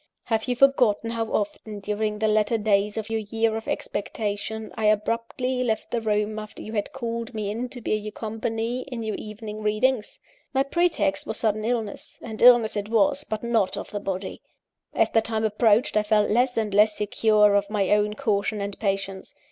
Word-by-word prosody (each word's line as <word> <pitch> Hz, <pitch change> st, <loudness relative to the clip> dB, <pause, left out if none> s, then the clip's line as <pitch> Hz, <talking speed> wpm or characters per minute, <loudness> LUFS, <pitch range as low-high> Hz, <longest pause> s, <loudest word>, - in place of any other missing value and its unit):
Have 225 Hz, -2 st, -1 dB
you 250 Hz, -, 0 dB
forgotten 240 Hz, -4 st, +3 dB
how 230 Hz, -1 st, -2 dB
often, 210 Hz, 0 st, -3 dB
during 210 Hz, +1 st, -2 dB
the 220 Hz, +1 st, +1 dB
latter 215 Hz, +1 st, +2 dB
days 205 Hz, -1 st, +1 dB
of 220 Hz, 0 st, -4 dB
your 225 Hz, -, 0 dB
year 225 Hz, +1 st, 0 dB
of 225 Hz, -, -5 dB
expectation, 210 Hz, +1 st, -3 dB
I 220 Hz, -, -2 dB
abruptly 230 Hz, +4 st, 0 dB
left 220 Hz, -3 st, -2 dB
the 235 Hz, -, 0 dB
room 215 Hz, 0 st, 0 dB
after 215 Hz, 0 st, -9 dB
you 220 Hz, -, -8 dB
had 205 Hz, -2 st, -2 dB
called 235 Hz, -2 st, -4 dB
me 210 Hz, -2 st, -2 dB
in 240 Hz, +4 st, -3 dB
to 245 Hz, -, -9 dB
bear -, -, -1 dB
you 215 Hz, 0 st, -2 dB
company 225 Hz, +2 st, -3 dB
in 245 Hz, -4 st, -5 dB
your 220 Hz, -1 st, -2 dB
evening 215 Hz, 0 st, -7 dB
readings? 215 Hz, +2 st, 0 dB, 0.4 s
My 270 Hz, -, +4 dB
pretext 325 Hz, -, 0 dB
was -, -, -3 dB
sudden 215 Hz, -1 st, 0 dB
illness; 225 Hz, -3 st, -3 dB
and 220 Hz, -1 st, -7 dB
illness 240 Hz, -3 st, +7 dB
it 205 Hz, 0 st, -3 dB
was, 285 Hz, +5 st, +2 dB
but 215 Hz, -4 st, -5 dB
not 230 Hz, -5 st, +1 dB
of -, -, -6 dB
the 205 Hz, -, -3 dB
body. 195 Hz, -1 st, -4 dB, 0.5 s
As -, -, +2 dB
the 225 Hz, -, +4 dB
time 220 Hz, 0 st, -2 dB
approached, 220 Hz, +4 st, +3 dB
I 215 Hz, -, +4 dB
felt 210 Hz, 0 st, +2 dB
less 245 Hz, +3 st, +2 dB
and 215 Hz, -3 st, 0 dB
less 210 Hz, +1 st, +5 dB
secure 210 Hz, 0 st, +3 dB
of 200 Hz, 0 st, +2 dB
my 205 Hz, -3 st, 0 dB
own 210 Hz, 0 st, +2 dB
caution 215 Hz, -4 st, 0 dB
and 200 Hz, 0 st, -4 dB
patience. 195 Hz, -2 st, -3 dB
220 Hz, 195 wpm, -25 LUFS, 210-230 Hz, 0.5 s, illness